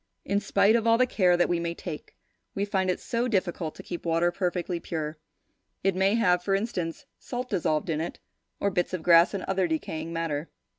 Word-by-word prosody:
In 200 +1 +1
spite 205 +1 +3
of 230 -1 +1
all 230 0 +5
the 255 - +4
care 180 -7 +3
that 175 - +3
we 175 -1 0
may 170 0 -3
take, 165 -4 -8 0.4
we 200 - 0
find 190 -2 0
it 180 - 0
so 240 +1 -1
difficult 180 -7 -1
to - - -10
keep 175 - -6
water 170 +1 +2
perfectly 180 -1 -2
pure. 155 -2 -4 0.6
It 195 -1 +2
may 195 +3 +3
have, 180 -6 +3
for 195 +2 +1
instance, 185 -6 -3
salt 250 0 -5
dissolved 155 -6 0
in 155 0 -1
it, 170 - -4 0.4
or 200 - +1
bits 180 0 -1
of 165 - -6
grass 170 +3 +6
and 195 - -3
other 190 -1 +1
decaying 160 0 -3
matter. 165 -2 -2
180 Hz, 205 wpm, -27 LUFS, 165-200 Hz, 0.6 s, grass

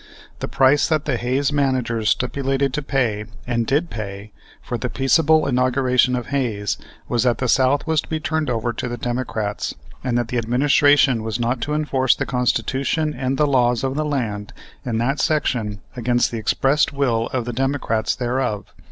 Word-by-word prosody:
The - - -3
price 135 +2 +3
that 155 -2 0
the 140 -4 0
Hayes 130 +4 0
managers 130 -6 0
stipulated 135 +1 0
to 150 - -1
pay, 120 -7 -1 0.2
and 120 -2 -1
did 155 +5 +1
pay, 100 -1 -6 0.3
for - - -5
the - - -3
peaceable 155 +3 +3
inauguration 125 -1 +2
of 125 -1 -4
Hayes 115 -7 -1 0.3
was 120 - +1
that 120 -3 +2
the 130 - -1
South 130 +3 +3
was 160 -2 +1
to - - -15
be 160 - -2
turned 155 -2 -1
over 120 0 -1
to 125 - -4
the 120 0 -4
Democrats 115 -4 -3 0.3
and 125 -2 0
that 120 -2 -1
the 125 - 0
administration 135 +1 +3
was 110 +1 -3
not 120 +1 -1
to 150 +1 -1
enforce 135 -4 +2
the - - -2
Constitution 130 +5 0
and 130 -1 -2
the 150 - +3
laws 125 -3 +2
of 135 0 0
the 155 +2 -1
land 115 -9 -3 0.3
in 120 -4 -2
that 135 +5 0
section 115 -9 0
against 120 0 +1
the 115 - -3
expressed 135 +7 +2
will 125 -5 0
of 125 -3 -3
the 120 - -4
Democrats 130 -3 0
thereof. 120 -5 -2
125 Hz, 180 wpm, -21 LUFS, 115-140 Hz, 0.3 s, price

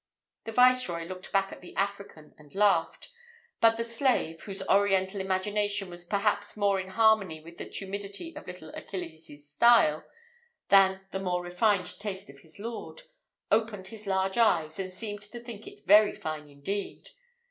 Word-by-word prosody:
The 225 - -4
viceroy 250 -8 +4
looked 185 +1 -7
back 195 0 +2
to - - -9
the 180 - -13
African 200 -6 -4
and 150 +3 -18
laughed; 195 - +2 0.5
but 225 0 +5
the 230 - -1
slave, 230 - 0
whose 195 -1 -6
Oriental 195 0 +2
imagination 200 +1 -1
was 175 0 -8
perhaps 205 +2 0
more 200 -2 +2
in 185 - -5
harmony 200 -5 +3
with 170 +2 -14
the - - -7
tumidity 200 - -6
of - - -10
little 180 -3 -9
Achilles's 160 -5 -8
style, 155 -1 +4 0.7
than 190 -1 +5
the 190 - -3
more 180 -2 -1
refined 180 +1 0
taste 195 -6 -6
of 140 - -18
his 160 +1 -18
lord, 230 - -7 0.5
opened 210 -3 0
his 215 -1 -11
large 190 +2 0
eyes, 165 -7 +2
and 185 -1 -4
seemed 205 +2 -6
to 210 +3 -9
think 235 -3 -10
it - - -13
very 210 +2 +6
fine 155 -1 -6
indeed. 170 +9 -5
195 Hz, 160 wpm, -29 LUFS, 175-210 Hz, 0.7 s, very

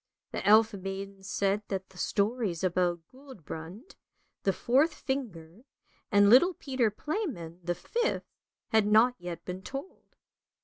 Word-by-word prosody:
" - - -63
The - - -4
elf 220 +1 +6
maiden 195 0 -6
said 195 +1 0
that 190 -1 -4
the 190 - -18
stories 205 -4 0
about 175 -1 +1
Guldbrand, 210 - -10 0.5
the 195 - +2
fourth 275 - +2
finger, 210 - -5 0.5
and 205 -1 +6
little 295 - +6
Peter 260 -6 0
Playman, 210 - -4
the 175 0 -1
fifth, 470 - -1 0.4
had 220 -2 +3
not 220 +4 +5
yet 175 -1 -7
been 180 +1 -5
told. 275 - -9
205 Hz, 135 wpm, -29 LUFS, 180-255 Hz, 0.5 s, elf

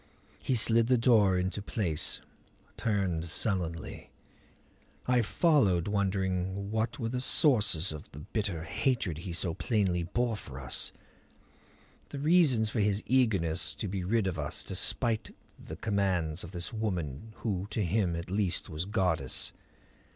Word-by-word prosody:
He 130 - 0
slid 115 0 +5
the 130 0 +4
door 110 -6 +4
into 95 +3 -1
place, 95 -7 -1 0.5
turned 95 -7 -1
sullenly. 85 -2 -2 1.0
I 125 -1 +3
followed, 110 - +3
wondering 95 -1 -1
what 110 +3 -1
were 115 -5 -2
the 125 +1 -2
sources 105 - +2
of 75 -1 -8
the - - -13
bitter 85 +1 -3
hatred 95 - -1
he 85 +2 -6
so 85 0 -1
plainly 95 -4 0
bore 115 +7 0
for 65 -9 -9
us; 65 -3 -1 1.2
the - - -6
reasons 140 -8 +3
for 115 - -1
his 105 0 +1
eagerness 100 -10 +1
to 105 - -4
be 95 -1 -3
rid 110 +3 +1
of 90 -3 -2
us 75 -1 -2
despite 110 -5 -1 0.2
the 80 - -8
commands 90 -5 0
of 85 - -7
this 85 +1 -5
woman 95 -4 -3
who 100 -3 -1
to 105 -2 -1
him 90 -1 +1
at 85 +2 -6
least 100 -3 0
was 80 +3 -3
goddess. 90 - -1
100 Hz, 145 wpm, -30 LUFS, 85-110 Hz, 1.2 s, slid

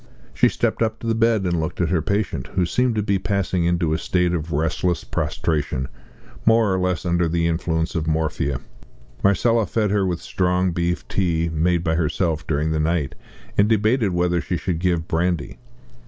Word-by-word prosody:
She - - +4
stepped - - -1
up 110 -1 +1
to - - -10
the 115 - +1
bed 115 -2 +2
and 85 -2 0
looked 80 +2 -3
at 85 -3 +1
her 85 -2 +1
patient, 100 +5 -1
who 90 -2 +2
seemed 125 +7 +1
to 105 - 0
be 100 -1 +1
passing 95 -3 0
into 85 -2 +1
a 80 - 0
state 90 0 +1
of 80 -1 -3
restless 80 +3 0
prostration, 70 -4 -2 0.5
more 115 -3 +4
or 95 - 0
less 90 0 -1
under 85 -1 +2
the 85 +1 0
influence 80 0 -1
of 80 -2 -2
morphia. 75 -4 -1 0.6
Marcella 110 +3 +3
fed 105 -3 0
her 100 -1 +2
with 90 -3 -1
strong 90 0 0
beef 85 +1 -2
tea 85 -3 0
made 85 +2 +1
by 80 -2 +1
herself 80 -1 0
during 75 +1 0
the 80 - 0
night, 80 -3 0 0.5
and 100 +1 +5
debated 110 +1 +2
whether 90 0 +1
she 90 - -2
should 85 -2 -2
give 85 -2 0
brandy. 85 +1 -1
85 Hz, 185 wpm, -22 LUFS, 80-95 Hz, 0.6 s, and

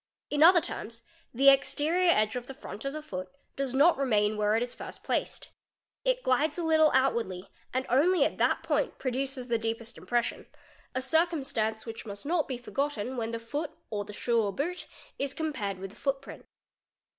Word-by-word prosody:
In 290 0 0
other 345 +2 +8
terms 230 -4 -6 0.3
the 270 +3 +6
exterior 295 +6 +3
edge 215 -8 +3
of 245 0 -4
the 270 - -8
front 220 -3 -9
of 275 - -2
the 310 0 -6
foot 185 -9 -6 0.3
does 270 -2 -2
not 295 +2 +5
remain 215 -5 +2
where 210 0 +2
it 230 - +2
is 245 - -5
first - - -9
placed. - - -2 0.7
glides 285 +7 +2
a 345 - -2
little 315 -1 +5
outwardly 230 -9 0 0.2
and 260 +1 -1
only 335 +8 +4
at - - -3
that - - +2
point 300 -3 0
produces 260 0 -2
the 235 -2 +1
deepes 225 +1 -4
impression, 240 -1 -1 0.5
a 260 - 0
circumstance 270 -8 +1
which 225 0 -7
must 200 +5 -7
not 325 0 +1
be 255 - -3
forgotten 260 -1 -2
when 230 -2 -2
the 230 - -3
foo 285 +8 -3 0.2
or 205 -1 -2
the 210 - -10
shoe 230 +2 +1
or 205 -2 0
boot 345 - -3 0.3
1s 275 0 -2
compared 255 - -2
with 190 +1 -7
the - - -16
footprint. 275 -1 -4
260 Hz, 185 wpm, -29 LUFS, 225-295 Hz, 0.7 s, other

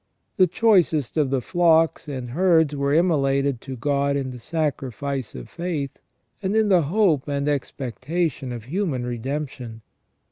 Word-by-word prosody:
The 185 - +5
choicest 175 - +2
of 150 -4 +2
the 135 -1 0
flocks 165 -3 +3
and 130 -4 -5
herds 160 -1 +3
were 140 0 0
immolated 140 -5 +2
to 135 -1 -7
God 140 +2 0
in 135 -2 -2
the 125 - -9
sacrifice 140 - -3
of - - -8
faith, 160 -6 -4 0.4
and 195 +1 -1
in 220 -1 +3
the 185 -3 +5
hope 160 -3 +2
and 140 0 -1
expectation 140 +1 -2
of 120 -2 -6
human 145 - -2
re 120 -1 -4
demption. 130 -3 -5
140 Hz, 150 wpm, -23 LUFS, 130-165 Hz, 0.4 s, The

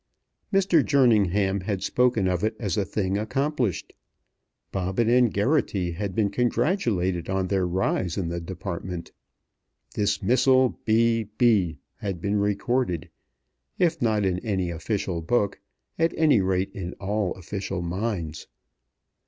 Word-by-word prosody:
Mr. 190 -6 +4
Jerningham 105 -8 +3
had 95 0 -3
spoken 125 -6 +2
of 90 0 0
it 110 - 0
as 100 -8 -1
a 105 - +1
thing 95 0 -1
accomplished. 130 - -1 0.8
Bobbin 95 +4 0
and 120 -1 +4
Geraghty 100 - +1
had 95 +2 -4
been 105 -3 +1
congratulated 115 - 0
on 95 -1 0
their 95 -2 +1
rise 90 -1 -1
in 95 -4 -1
the 85 0 -3
department. 90 -1 -6 0.8
"Dismissal 125 +5 +3 0.2
B. 115 0 +3
B." 100 -10 +3 0.2
had 95 -4 -4
been 100 +4 0
recorded, 100 -4 -1 0.7
if 170 -2 +1
not 110 -3 +2
in 90 -1 0
any 95 -6 -2
official 85 +1 -2
book, 100 +3 0 0.4
at 165 0 +2
any 150 -9 +4
rate 95 0 0
in 90 -2 -5
all 100 -1 -2
official 95 0 -4
minds. 85 -4 -3
100 Hz, 130 wpm, -25 LUFS, 90-120 Hz, 0.8 s, Mr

